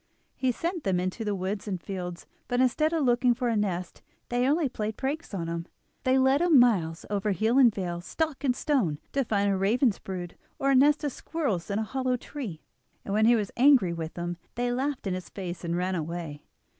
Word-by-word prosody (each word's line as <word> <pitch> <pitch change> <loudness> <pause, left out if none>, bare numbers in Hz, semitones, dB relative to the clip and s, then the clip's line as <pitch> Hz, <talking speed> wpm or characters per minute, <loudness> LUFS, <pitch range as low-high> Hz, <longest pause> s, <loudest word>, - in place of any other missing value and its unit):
He 260 -1 +1
sent 340 +5 -3
them 185 -2 +1
into 185 +5 -2
the 210 -2 -1
woods 195 +3 -3
and 190 -3 -2
fields, 180 -1 -6 0.2
but 245 - 0
instead 280 +5 +3
of 325 -3 +1
looking 245 -1 +3
for 245 0 -1
a 230 - +1
nest 185 -4 -2 0.3
they 245 +1 +1
only 305 +1 +2
played 220 -4 -4
pranks 290 +5 -3
on 185 -5 -3
him. 170 +1 -4 0.4
They 260 +1 +4
led 265 +3 +4
him 345 -4 +5
miles 180 -10 +3
over 205 0 0
hill 220 +8 +2
and 245 -4 +7
vale, 175 -4 -4
stock 310 - -3
and 255 -3 +2
stone, 235 - +1
to 275 - +1
find 205 -3 +1
a - - +2
raven's 215 +4 +2
brood, 180 -2 -6 0.2
or 275 0 +1
a - - +4
nest 290 +4 +5
of 290 - 0
squirrels 255 - -3
in 200 - -1
a 220 - 0
hollow 255 +2 -1
tree, 235 - -7 0.4
and 200 - -3
when 215 +1 +4
he 240 - +6
was 210 -3 -1
angry 250 -9 +5
with 165 -1 -5
them 175 0 -4 0.2
they 245 0 0
laughed 265 +1 -2
in 190 - -1
his 185 0 -5
face 180 -3 -6
and 170 0 -1
ran 185 +1 0
away. 165 -3 -4
220 Hz, 220 wpm, -28 LUFS, 180-265 Hz, 0.4 s, and